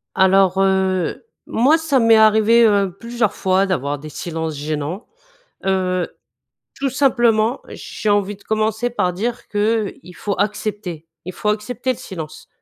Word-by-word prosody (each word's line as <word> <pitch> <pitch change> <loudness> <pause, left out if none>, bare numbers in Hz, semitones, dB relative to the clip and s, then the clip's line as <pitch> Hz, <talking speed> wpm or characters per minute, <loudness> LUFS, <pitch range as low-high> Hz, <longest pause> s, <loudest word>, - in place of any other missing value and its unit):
Alors, 190 0 +4
heu, 190 - +1 0.2
moi, 270 +8 +3
ça 315 -5 +1
m'est 230 -1 +5
arrivé, 220 +2 +5
heu, 200 -4 +2
plusieurs 235 -2 -1
fois 190 +1 +1
d'avoir 145 -6 -2
des 155 +2 -9
silences 160 0 -4
gênants. 150 - -4 0.6
Heu, 185 -2 0 0.7
tout 275 0 -1
simplement, 240 -3 +2
j'ai 215 - -5
envie 205 0 +1
de 200 - -22
commencer 220 +2 0
par 190 -7 0
dire 230 +6 -3
qu'il 205 -4 -1
faut 200 +2 -3
accepter. 205 -5 -3 0.2
Il 185 - -6
faut 210 - -2
accepter 245 +4 -1
le - - -13
silence. 160 -6 -8
205 Hz, 145 wpm, -20 LUFS, 185-225 Hz, 0.7 s, m'est